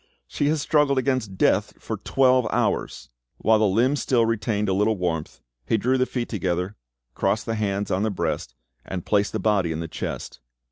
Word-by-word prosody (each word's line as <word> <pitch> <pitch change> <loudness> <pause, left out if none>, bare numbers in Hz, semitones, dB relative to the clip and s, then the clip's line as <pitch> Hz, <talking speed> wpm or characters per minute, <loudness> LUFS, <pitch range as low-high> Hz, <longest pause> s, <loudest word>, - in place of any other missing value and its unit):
She 145 - -1
has 155 +1 +1
struggled 145 -3 +3
against 130 -7 0
death - - +2
for - - -5
twelve 130 -3 +3
hours!" - - -1 0.3
While 110 0 +3
the 110 - +4
limbs 125 +9 +2
still 120 -3 +2
retained 110 -2 0
a 95 - +1
little 105 +2 +2
warmth, 85 -4 -3 0.3
he 115 - +2
drew 130 +4 +1
the 130 - +2
feet 120 -2 -3
together, 90 -2 -2 0.4
crossed 100 +2 0
the 115 - -2
hands 100 -2 -1
on 95 - +1
the 110 - +1
breast, 75 - -3 0.3
and 90 -2 -5
placed 105 -1 +2
the - - -2
body 100 -4 +1
in 80 - -3
the 85 - -4
chest. - - -6
105 Hz, 190 wpm, -24 LUFS, 95-125 Hz, 0.4 s, the